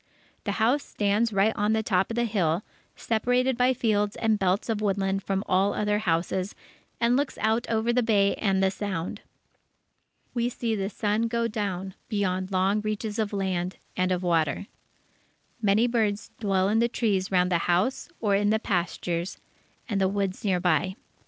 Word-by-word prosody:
The 205 - 0
house 235 +7 +2
stands 210 +3 0
right 200 +2 +3
on 210 +1 +1
the 220 0 +1
top 190 -3 +1
of 230 - -3
the 240 - +1
hill, 185 -5 0 0.3
separated 245 +3 +1
by 250 +1 +3
fields 210 -3 +1
and 220 -2 +1
belts 190 +1 +1
of 220 -2 -1
woodland 195 -1 0
from 195 0 -1
all 190 +2 +2
other 210 0 +1
houses, 180 +1 -1 0.4
and 235 +1 +3
looks 280 +1 -1
out 220 +2 +1
over 225 +1 +1
the 250 - +3
Bay 205 -4 +3
and 195 -2 +2
the 190 - +3
Sound. 185 -4 -4 1.1
We 240 0 0
see 235 -2 -2
the 195 -1 -2
sun 215 +2 0
go 235 0 0
down 195 -4 -3 0.2
beyond 190 -3 -1
long 190 +3 +2
reaches 215 +1 -3
of 215 -2 0
land 190 -2 -2 0.2
and 185 0 +1
of 180 0 0
water. 165 +1 +1 1.0
Many 210 +2 +3
birds 220 -4 0
dwell 195 -3 +1
in 215 +2 +2
the 235 +1 +3
trees 200 -6 0
round 180 -1 +3
the 170 - +3
house 185 +10 +1
or 210 -3 +1
in 205 +1 +3
the 220 - +3
pastures 175 -3 -2 0.5
and 205 -5 -1
the 190 - +4
woods 195 -1 -2
near 190 -4 +1
by. 180 +1 +1
205 Hz, 175 wpm, -26 LUFS, 190-225 Hz, 1.1 s, the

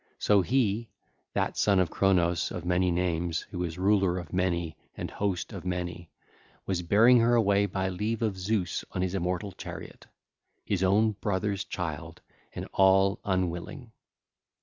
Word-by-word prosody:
So 105 -2 +3
he, 115 0 0 0.4
that - - -1
Son 100 -2 +3
of 90 -3 +1
Cronos, 85 -3 +2
of 90 - -6
many 90 +1 +2
names, 85 -1 0
who 90 -1 -3
is 85 -1 -4
Ruler 95 -1 +2
of 85 -3 -7
Many 85 -3 0 0.2
and - - -5
Host 95 -4 -2
of - - -7
Many, 90 -2 -4 0.6
was 95 -2 -1
bearing 115 +8 +5
her 120 +1 +4
away 100 -3 +3
by 95 0 -2
leave 105 +5 -2
of 105 -3 0
Zeus 95 -1 -1
on 90 - -1
his 95 0 -2
immortal 90 +1 -2
chariot—his 95 +1 -8
own 105 +4 +3
brother's 100 -1 -2
child 85 -7 -5 0.4
and - - -5
all 95 +1 +4
unwilling. 95 - -3
95 Hz, 150 wpm, -28 LUFS, 90-100 Hz, 0.6 s, bearing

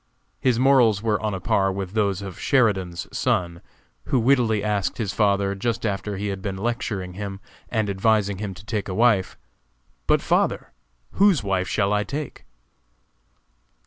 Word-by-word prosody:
His 125 -3 +2
morals 120 -5 +4
were 110 -2 +1
on 105 -2 -1
a - - -4
par 95 +1 +1
with 95 -1 -4
those 100 -2 0
of 95 -2 -8
Sheridan's 95 -9 +1
son, 85 -1 0 0.4
who 130 - +1
wittily 115 -4 +2
asked 105 -2 -1
his 100 -5 -2
father, 100 -1 +2
just 115 +3 -2
after 100 -1 -2
he 100 +1 -3
had 95 -1 -4
been 95 -1 -4
lecturing 105 -4 -3
him, 100 0 -6 0.3
and 110 -3 0
advising 100 0 +1
him 100 -3 -4
to 100 - -13
take 105 -3 -3
a 95 - -3
wife, 110 -4 +2 0.7
"But, - - +3
father, - - 0 0.4
whose 195 - +3
wife 95 -2 0
shall 100 0 +1
I 105 0 +1
take?" 145 +6 -6
105 Hz, 160 wpm, -23 LUFS, 95-115 Hz, 0.7 s, morals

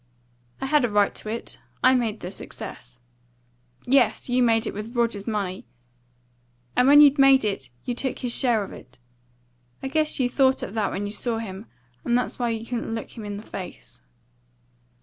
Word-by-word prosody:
"I - - -3
had 295 0 +3
a 245 - +2
right 205 -1 +2
to 215 - -7
it. 230 +2 -5 0.2
I 255 - +6
made 230 -4 0
the 180 - -6
success." 125 -9 -8 0.9
"Yes, 260 -1 +2
you 250 +1 +2
made 225 -2 +3
it - - -3
with 215 +4 -7
Rogers's 230 -4 0
money; 195 - -3 1.1
and 250 - +4
when 290 +1 +9
you'd 285 0 +6
made 270 -3 +6
it 165 -12 -3 0.2
you 245 - -1
took 260 +1 -2
his 245 -2 -2
share 235 -5 +2
of 195 - -9
it. 125 - -14 0.9
I - - -2
guess 310 +1 +1
you 255 - +3
thought 260 +1 +2
of - - -6
that 220 -2 0
when 205 - -3
you 205 - -4
saw 230 +2 -2
him, 210 -1 -7 0.4
and 240 0 +2
that's 250 - -2
why 240 -1 0
you 225 0 -3
couldn't 230 -1 -3
look 225 - -6
him 225 - -8
in 205 -1 -5
the 210 - -9
face." 185 -4 -9
230 Hz, 190 wpm, -24 LUFS, 205-255 Hz, 1.1 s, when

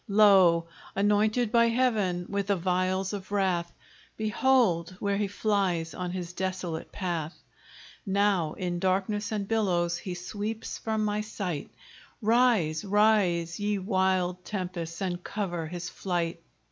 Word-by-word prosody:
Lo! 195 -5 +6 0.3
anointed 210 +3 +2
by 235 0 +5
Heaven 220 -8 +1
with 200 -1 -2
the 200 - +3
vials 185 +2 0
of 200 -1 -6
wrath, 185 -4 0 0.5
Behold, 215 -6 +2
where 200 -1 0
he 205 0 0
flies 195 -5 0
on 180 -1 -4
his 180 -1 -5
desolate 180 -3 -3
path! 170 -4 -3 0.7
Now 195 -5 +1
in 175 -2 -3
darkness 195 +3 0
and 205 -2 -2
billows, 175 -6 +1
he 180 -1 -5
sweeps 210 +5 -5
from 220 -1 -1
my 210 0 0
sight: 185 -8 -4 0.5
Rise, 220 -9 +3
rise! 195 -5 +2
ye 205 0 0
wild 185 -2 0
tempests, 180 -3 -4
and 180 -1 -3
cover 175 -6 -3
his 175 +2 -5
flight! 170 -3 -2
190 Hz, 130 wpm, -28 LUFS, 175-210 Hz, 0.7 s, Lo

